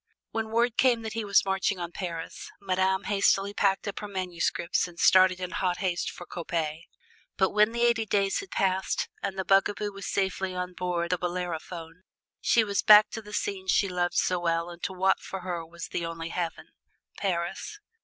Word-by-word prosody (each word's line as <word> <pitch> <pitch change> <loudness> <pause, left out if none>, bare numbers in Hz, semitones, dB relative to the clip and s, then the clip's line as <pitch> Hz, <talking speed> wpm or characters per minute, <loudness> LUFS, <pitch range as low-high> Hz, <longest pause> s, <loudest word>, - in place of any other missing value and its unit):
When 225 -1 -2
word 235 +1 +1
came 240 -3 +3
that 220 - -5
he 225 0 -2
was 200 -1 +3
marching 190 0 0
on 175 -1 -5
Paris, 170 -3 -6
Madame 190 0 +1
hastily 200 0 +2
packed 195 0 +1
up 200 - -4
her 210 - -6
manuscripts 180 -2 -1
and 175 -1 -14
started 185 -1 +6
in 180 -1 -4
hot 180 -2 0
haste 180 -3 -1
for 175 - -9
Coppet. 165 -2 -3 0.5
But 190 -1 +3
when 210 +1 +4
the 235 0 -1
eighty 235 -2 +2
days 195 -1 +1
had 390 - -8
passed 190 -1 0
and 195 -1 -3
the 190 - -2
bugaboo 205 +1 +2
was 195 0 -7
safely 190 -1 -1
on 180 0 -3
board 175 -1 -2
the 180 - +1
"Bellerophon," 175 -1 -5 0.4
she 230 - +4
came 200 - -4
back 210 0 +9
to 225 - -5
the 210 -1 -12
scenes 385 - -3
she 200 - +3
loved 175 -1 -1
so 180 -1 +2
well 170 0 -1
and 170 0 -12
to - - -2
what 190 +1 +2
for 190 - -7
her 175 -2 -4
was 170 +1 -9
the 170 - -3
only 165 0 -5
heaven 170 -1 -4 0.5
Paris. 190 - -2
190 Hz, 195 wpm, -28 LUFS, 175-205 Hz, 0.5 s, back